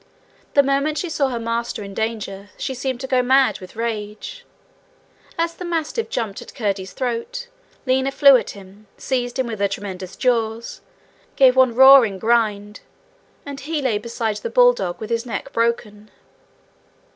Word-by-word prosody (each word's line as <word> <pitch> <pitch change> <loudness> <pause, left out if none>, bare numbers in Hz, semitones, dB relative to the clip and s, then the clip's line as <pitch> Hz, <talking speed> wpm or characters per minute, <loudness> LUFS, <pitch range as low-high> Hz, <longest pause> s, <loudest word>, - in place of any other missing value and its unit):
The 280 - +6
moment 280 +3 0
she 350 0 -3
saw 280 -3 +1
her 245 - -3
master 230 -1 -3
in 200 0 -9
danger 205 -2 -4
she 265 - -3
seemed 260 -1 -3
to 265 - -4
go 255 -1 +2
mad 255 -4 +3
with 185 +2 -12
rage. 215 -2 -5 0.9
As 335 0 0
the 360 - -9
mastiff 345 +6 -2
jumped 220 -5 -3
at - - -13
Curdie's 195 -4 -3
throat, 255 - -3 0.4
Lina 260 +1 +1
flew 275 0 +7
at 250 - 0
him, 200 +2 -15
seized 245 -1 -2
him 260 - 0
with 225 -3 -5
her 200 - +2
tremendous 195 -2 -6
jaws, 230 -2 -1 0.5
gave 260 -2 +5
one 260 -3 +4
roaring 265 -6 +7
grind, 210 -2 0 0.7
and 280 -1 -7
he 305 +3 -3
lay 250 -7 0
beside 225 -1 -3
the 470 - -5
bulldog - - +3
with 220 +1 -7
his 230 0 0
neck 250 +3 -6
broken. 215 -2 -1
235 Hz, 160 wpm, -21 LUFS, 210-270 Hz, 0.9 s, flew